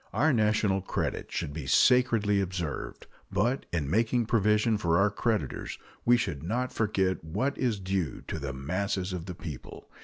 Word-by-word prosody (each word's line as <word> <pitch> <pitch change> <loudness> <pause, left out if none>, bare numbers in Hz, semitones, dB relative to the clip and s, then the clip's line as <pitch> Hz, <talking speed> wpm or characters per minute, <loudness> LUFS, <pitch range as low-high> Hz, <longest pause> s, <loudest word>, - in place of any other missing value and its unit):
Our 155 0 +3
national 105 -3 +2
credit 95 - -3
should 70 - -3
be 75 -3 -6
sacredly 110 - +4
observed, 90 -6 -4 0.3
but 115 +7 0
in 80 -5 -1
making 115 - +2
provision 105 0 +2
for 85 -4 +2
our 100 +2 +3
creditors 110 +1 -2 0.3
we 120 +1 +6
should 75 - -2
not 120 - -2
forget 95 -5 0
what 105 - -1
is 120 -6 0
due 95 -6 -2
to - - -4
the 70 0 -4
masses 90 +7 -2
of 90 -1 -5
the 90 - -5
people. 80 -6 -9
100 Hz, 160 wpm, -29 LUFS, 85-115 Hz, 0.3 s, we